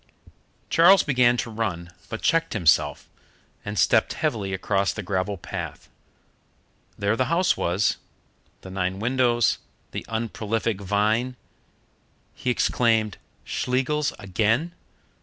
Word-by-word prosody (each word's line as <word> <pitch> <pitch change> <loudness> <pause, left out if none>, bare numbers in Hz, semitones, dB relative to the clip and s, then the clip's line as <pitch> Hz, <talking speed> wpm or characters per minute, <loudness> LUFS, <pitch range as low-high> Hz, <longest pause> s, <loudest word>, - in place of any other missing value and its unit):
Charles 180 +3 +6
began 125 -3 +3
to 115 - -3
run, 90 -6 -3 0.2
but 110 - -6
checked 165 0 +2
himself, 90 -8 +2 0.6
and 105 0 -5
stepped 110 -2 +3
heavily 110 -11 -2
across 95 +1 0
the 105 - -6
gravel 95 +2 -2
path. - - -7 1.1
There 100 +2 +1
the 130 - +1
house 175 +7 +2
was 95 +4 +1 0.6
the 95 - -10
nine 95 0 -2
windows, 120 0 +2 0.3
the - - -5
unprolific 110 -1 -2
vine. 110 +6 +1 1.0
He 125 - -3
exclaimed, 115 -4 +1 0.3
"Schlegels 135 +4 0
again!" 110 - 0
110 Hz, 110 wpm, -24 LUFS, 100-125 Hz, 1.1 s, Charles